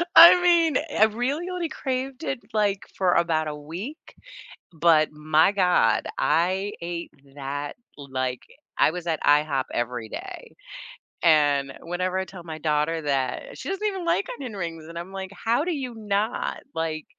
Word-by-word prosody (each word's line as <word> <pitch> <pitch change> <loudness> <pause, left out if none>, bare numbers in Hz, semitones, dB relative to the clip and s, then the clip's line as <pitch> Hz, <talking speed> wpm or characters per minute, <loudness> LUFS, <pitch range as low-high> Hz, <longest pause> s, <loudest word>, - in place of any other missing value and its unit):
I 350 +1 +11
mean, 335 -5 +4 0.2
I 215 - +7
really 255 +10 -2
only 355 -3 -3
craved 265 +1 -4
it, 265 - -2
like, 205 -2 +1
for 185 -2 +3
about 165 -2 +1
a 150 - -4
week, 180 - -8 0.6
but 160 -1 +3
my 155 +3 +3
god, 180 - +3
I 190 +4 +1
ate 170 0 -5 0.2
that, 145 +1 -5 0.2
like 130 -3 -3 0.4
I - - +4
was 175 0 -6
at 160 -2 -1
IHOP 145 -2 +3
every 120 -2 -3
day, - - -8 0.7
and 145 -4 +4
whenever 180 +2 -2
I 190 - -2
tell 185 -2 -11
my 160 -2 -7
daughter 155 +1 0
that 145 - -2
she - - -6
doesn't 390 +2 -2
even 380 -4 -3
like 340 +4 +1
onion 245 -6 -7
rings, 165 -4 -5
and 170 - -9
I'm 175 +3 -8
like, 190 0 -6
"How 230 +7 0
do 350 0 -1
you 255 -5 -4
not?" 210 +1 -2
like 160 -1 -2
175 Hz, 160 wpm, -25 LUFS, 150-235 Hz, 0.7 s, I